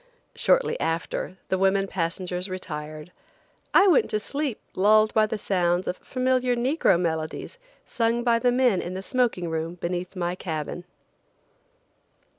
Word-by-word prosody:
Shortly - - +2
after, 165 +3 -2
the 190 - +1
women 195 0 +3
passengers 180 0 -3
retired. 155 -3 -6 0.6
I - - +6
went 405 +4 +4
to 215 - 0
sleep 280 +1 -3
lulled 215 +3 +4
by 215 -1 +4
the 215 - -3
sounds 180 -3 0
of 180 - -2
familiar 255 -1 0
negro 240 - +2
melodies 160 - -3 0.3
sung 230 0 0
by 235 -1 +3
the 245 +1 +3
men 245 -6 +3
in 180 +1 -5
the 190 - -5
smoking 240 -8 0
room 160 +1 -3
beneath 180 +2 -4
my 175 -1 -1
cabin. 170 -1 -5
190 Hz, 140 wpm, -25 LUFS, 175-240 Hz, 0.6 s, I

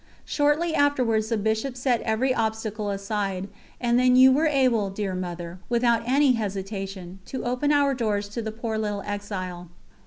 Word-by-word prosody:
Shortly 300 +3 +1
afterwards 250 -7 +2
the 230 - +1
Bishop 220 +5 -1
set 245 -2 +1
every 235 +4 +1
obstacle 220 -2 -2
aside, 195 -1 -2 0.3
and 240 0 +2
then 250 0 +4
you 260 +1 +8
were 300 +5 +3
able, 255 -8 +2
dear 195 0 -3
Mother, 175 -1 -5
without 235 -1 +2
any 275 +1 +4
hesitation, 195 -4 -4
to 260 - -5
open 250 +4 0
our 285 -1 +3
doors 210 -5 -1
to 230 +3 -4
the 220 -1 -4
poor 220 0 -3
little 205 -2 -2
exile. 185 -4 -5
220 Hz, 160 wpm, -25 LUFS, 200-255 Hz, 0.3 s, you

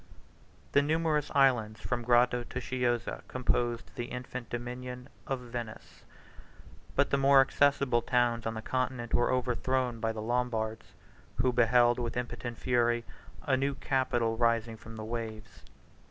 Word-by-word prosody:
The 140 - +5
numerous 155 0 +1
islands 120 -6 +3
from 120 -1 -2
Grado 120 +1 +3
to 125 - -5
Chiozza 120 -1 -1
composed 120 -2 -1
the 120 - -4
infant 125 -1 -7
dominion 125 +1 -6 0.2
of 135 -2 -1
Venice: 120 -2 -8 0.9
but 140 0 +2
the 140 - +2
more 135 0 +6
accessible 135 -2 +3
towns 120 -1 +1
on 115 - -3
the 110 - -6
Continent 130 -2 -2
were 120 - +3
overthrown 125 -1 0
by 115 0 0
the 110 - -6
Lombards, 115 -1 -2 0.4
who 130 -1 +1
beheld 120 0 +4
with 120 -1 -3
impotent 120 -1 -4
fury 120 -2 +1 0.4
a 135 - +2
new 135 +1 0
capital 120 -5 0
rising 115 -1 +1
from 110 +1 -11
the 110 -1 -6
waves. 110 -1 -6
120 Hz, 140 wpm, -30 LUFS, 115-130 Hz, 0.9 s, more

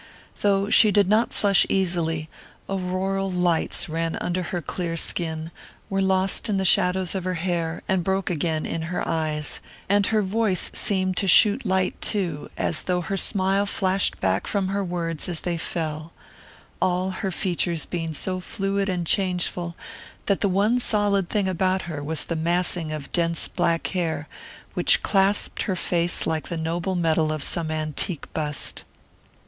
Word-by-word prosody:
Though 200 0 +1
she 220 - +7
did 205 -2 +3
not 215 +4 +2
flush 200 -2 +4
easily, 170 -4 0 0.4
auroral 190 +1 -2
lights 175 0 +1
ran 165 0 -2
under 180 +1 -2
her 175 +1 -3
clear 170 +1 -4
skin, 160 -1 -2 0.4
were 195 0 +1
lost 190 +2 +2
in 200 - +1
the 190 - 0
shadows 180 0 +2
of 190 -2 -3
her 185 0 -2
hair, 170 -1 -2
and 190 -2 +1
broke 190 +1 -1
again 160 -1 -1
in 165 - -3
her 180 - -3
eyes; 155 -2 -1 0.3
and 200 0 +3
her 215 -1 +1
voice 200 -1 +1
seemed 185 -2 +1
to 195 - +1
shoot 210 +5 +5
light 190 -1 0
too, 175 -8 -2
as - - +2
though 180 -1 0
her 195 +3 -3
smile 195 +1 +1
flashed 190 -1 +1
back 95 +1 0
from 195 -2 -1
her 200 +1 -1
words 170 -1 -3
as 170 -2 -2
they 175 -1 -2
fell 160 -1 -4 0.7
all 185 +1 +1
her 190 +1 -3
features 175 -3 0
being 165 -3 -4
so 185 +4 -1
fluid 195 +1 -2
and 180 -2 -2
changeful 180 -2 0 0.5
that 200 - 0
the 200 - +2
one 205 +6 +2
solid 205 -5 +2
thing 205 -2 0
about 185 +1 0
her 155 -4 -6
was 155 +1 -1
the 170 - -3
massing 170 0 +1
of 150 -2 -6
dense 170 -1 +1
black 170 -2 0
hair 160 -5 -2 0.5
which - - +4
clasped 195 +1 +2
her 190 - -1
face 175 -1 +1
like 160 -1 -2
the 170 - -4
noble 170 +3 -2
metal 160 -2 +1
of 155 -2 -3
some 165 0 0
antique 155 +2 -1
bust. 150 -2 -1
180 Hz, 165 wpm, -24 LUFS, 165-195 Hz, 0.7 s, she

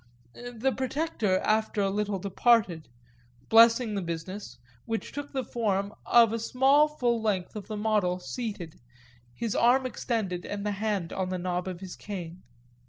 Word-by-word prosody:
The 245 +1 -3
protector 260 - 0
after 215 0 +1
a 195 -1 +2
little 205 0 -1
departed, 195 -3 +2 0.6
blessing 230 0 +6
the 200 - -1
business, 170 +4 -6 0.3
which 225 -1 -3
took 285 0 -6
the 265 -1 -2
form 205 -4 -1
of 230 -2 +6
a 230 - -1
small 270 +6 +4
full 245 -6 0
length 200 -4 -1
of 210 - -7
the 215 - -5
model 205 -4 +1
seated, 200 -4 -6 0.6
his 230 -3 -3
arm 255 +3 +4
extended 215 -8 -2
and 205 0 -5
the 210 - 0
hand 200 -4 -2
on 185 -1 -2
the 185 - -2
knob 180 0 -2
of 180 -1 -6
his 185 -2 -7
cane. 180 -4 -7
210 Hz, 160 wpm, -28 LUFS, 185-235 Hz, 0.6 s, blessing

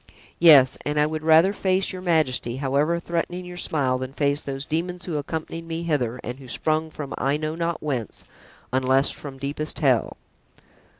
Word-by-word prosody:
Yes, 145 -7 +7
and 150 0 -1
I 150 - +4
would 155 0 -3
rather 160 +5 +5
face 190 -1 0
your 185 - -6
majesty, 155 -9 +1
however 145 +5 +1
threatening 175 +1 -3
your 180 0 -8
smile, 135 -7 0
than 130 +1 -5
face 145 0 0
those 135 0 -5
demons 175 +3 -3
who 170 - -4
accompanied 160 +2 -5
me 165 0 -4
hither 130 -7 -1
and 125 +2 -6
who 135 - -12
sprung 155 +5 0
from 145 -3 -7
I 140 +3 +1
know 155 0 -3
not 170 0 -3
whence, 130 -8 -4 0.5
unless 130 +1 +3
from 140 -2 -8
deepest 145 +3 -2
hell." 130 -7 +1
150 Hz, 175 wpm, -24 LUFS, 135-165 Hz, 0.5 s, Yes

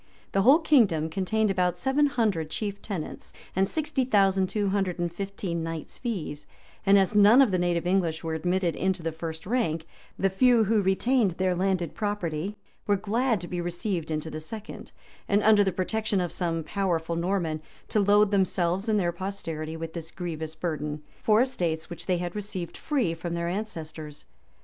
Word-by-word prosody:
The 195 - +2
whole 265 +9 +7
kingdom 215 - +3
contained 205 +4 +1
about 180 -2 +1
seven 270 +9 +2
hundred 210 - 0
chief 200 +4 -4
tenants, 190 -7 -6 0.2
and 190 +1 +2
sixty 300 -3 0
thousand 195 -5 +3
two 205 -2 0
hundred 190 -3 0
and 175 -1 -2
fifteen 195 -2 -4
knights' 165 -1 -6
fees;[] 180 - -4 0.4
and 200 +1 +7
as 195 +1 +3
none 210 +4 +7
of 265 -6 +6
the 185 - +1
native 175 -1 0
English 175 -3 +1
were 165 -1 -2
admitted 175 +1 0
into 190 -1 -1
the 165 - -1
first 160 0 -6
rank, 180 -8 0 0.3
the 195 0 +1
few 240 +3 +5
who 215 0 +2
retained 200 +2 +2
their 185 -1 +2
landed 180 -2 0
property 205 -2 -3 0.3
were 205 - +4
glad 220 +3 0
to 175 - -5
be 175 -1 -3
received 175 0 -3
into 155 0 -3
the 155 - -5
second, 210 +7 -8 0.4
and, 205 0 +2
under 210 -1 +6
the 190 - +1
protection 205 +3 -1
of 175 -2 -1
some 165 -2 -2
powerful 170 -3 -1
Norman, 170 -3 -1 0.3
to 215 - +2
load 205 +1 +4
themselves 190 0 +1
and 210 -1 +3
their 175 -3 +1
posterity 165 -4 -5
with 165 0 -6
this 165 -2 -6
grievous 160 -3 -5
burden, 150 -2 -3 0.2
for 215 +1 +4
estates 175 -12 -2
which 170 - -7
they 180 -2 +2
had 175 +1 -4
received 195 -4 -5
free 260 - 0
from 170 +1 -4
their 170 0 -2
ancestors. 160 -6 -5
185 Hz, 180 wpm, -27 LUFS, 165-210 Hz, 0.4 s, whole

